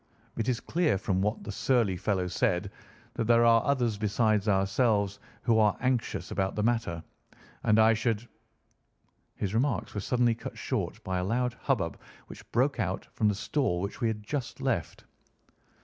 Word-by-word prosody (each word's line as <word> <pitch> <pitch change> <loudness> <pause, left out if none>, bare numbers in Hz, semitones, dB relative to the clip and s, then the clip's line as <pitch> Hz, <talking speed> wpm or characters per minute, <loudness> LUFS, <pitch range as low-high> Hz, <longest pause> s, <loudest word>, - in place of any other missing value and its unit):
It 115 +1 -1
is 125 -2 0
clear 160 - +1
from 95 -1 -1
what 105 +2 -1
that - - -5
surly 115 -3 +1
fellow 95 0 0
said 90 +1 0 0.4
that 115 - -2
there 115 +1 +5
are 115 -1 +5
others 120 -7 0
besides 105 0 +1
ourselves 100 0 +2 0.2
who 115 -2 +3
are 105 -2 +3
anxious 125 -2 -1
about 95 0 -1
the 105 - -1
matter, 115 -8 0 0.6
and 105 - +4
I 110 +1 +6
should—" 115 0 -1 1.1
His 100 -1 -3
remarks 125 +2 0
were 105 - -2
suddenly 120 +1 +2
cut 115 - -8
short - - -3
by 95 -1 -1
a - - -1
loud 120 +5 0
hubbub - - -1 0.3
which - - -13
broke 130 +3 +1
out 95 -3 -2
from 110 - +1
the 105 - +2
stall 100 -3 0
which 100 +7 -5
we 115 - +2
had 105 -1 -3
just 135 +3 -4
left. - - -2
110 Hz, 170 wpm, -29 LUFS, 100-120 Hz, 1.1 s, I